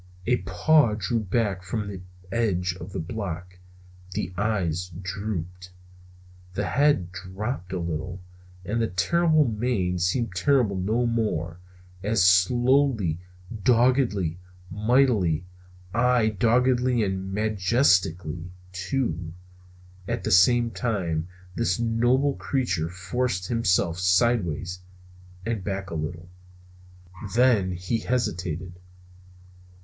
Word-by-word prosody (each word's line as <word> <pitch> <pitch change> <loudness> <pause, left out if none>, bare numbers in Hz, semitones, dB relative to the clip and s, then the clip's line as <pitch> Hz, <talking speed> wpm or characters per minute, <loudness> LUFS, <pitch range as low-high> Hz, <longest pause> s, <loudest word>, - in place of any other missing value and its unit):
A 125 +1 +3
paw 110 - +3
drew 110 +3 -1
back 105 -2 -1
from 100 +3 -3
the 95 -2 -7 0.3
edge 90 -6 0
of 85 +4 -8
the - - -5
block, 90 -1 -5 0.5
the 90 -1 -3
eyes 90 -4 -1
drooped, 90 -2 -5 0.9
the 100 - -1
head 125 -7 +2
dropped 95 +2 -5
a 95 - -2
little, 85 +2 -4 0.5
and 115 +4 -1
the 115 - +1
terrible 155 - +2
mane 105 -6 -1
seemed 95 +4 0
terrible 115 +1 +2
no 110 +6 0
more, 105 -8 -1 0.4
as 105 -1 +2
slowly, 120 - +3 0.4
doggedly, 120 - +2 0.3
mightily, 105 - +2 0.5
aye 120 -1 +3
doggedly 125 +3 +2
and 95 -1 -3
majestically, 95 - +1 0.2
too, 95 - -2 0.7
at 120 +2 -2
the 110 - -1
same 115 +5 +5
time, 95 -7 -2 0.3
this 90 +1 0
noble 120 +5 +2
creature 90 - -1
forced 95 +2 -2
himself 95 -7 +1
sidewise 90 -2 +1 0.7
and 115 -4 -2
back 95 0 -4
a - - -4
little. 85 +2 -4 1.1
Then 115 -7 +3
he 90 +6 -2
hesitated. 90 -7 -2
100 Hz, 105 wpm, -25 LUFS, 90-120 Hz, 1.1 s, same